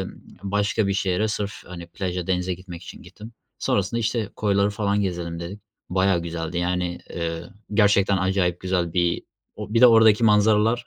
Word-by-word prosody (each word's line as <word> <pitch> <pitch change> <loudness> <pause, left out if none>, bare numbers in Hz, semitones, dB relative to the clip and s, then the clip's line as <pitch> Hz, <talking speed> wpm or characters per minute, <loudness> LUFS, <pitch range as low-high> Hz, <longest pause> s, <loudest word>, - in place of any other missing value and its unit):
emm, - - -4 0.3
başka 100 +1 0
bir 100 - +1
şehre 95 +2 0
sırf, 105 -1 -2
hani, 85 -1 -8
plaja 90 -1 -4
denize 90 -1 0
gitmek 90 -1 -10
için 85 - -11
gittim. 105 +6 -12 0.3
Sonrasında, 100 +4 0
işte, 115 -2 -1
"Koyları 100 -1 +2
falan 100 -1 0
gezelim." 85 -3 -3
dedik. 95 +5 -7 0.3
Bayağı 95 -2 +2
güzeldi, 85 0 -4
yani, 90 0 -1
eee, 85 0 -4 0.3
gerçekten 100 -2 +4
acayip 95 -2 0
güzel 90 -3 -1
bir 85 -1 +1 0.3
o 110 - -7
bir 115 - +4
de 125 - +10
oradaki 115 -1 +6
manzaralar 110 +2 +3
95 Hz, 165 wpm, -23 LUFS, 90-105 Hz, 0.3 s, de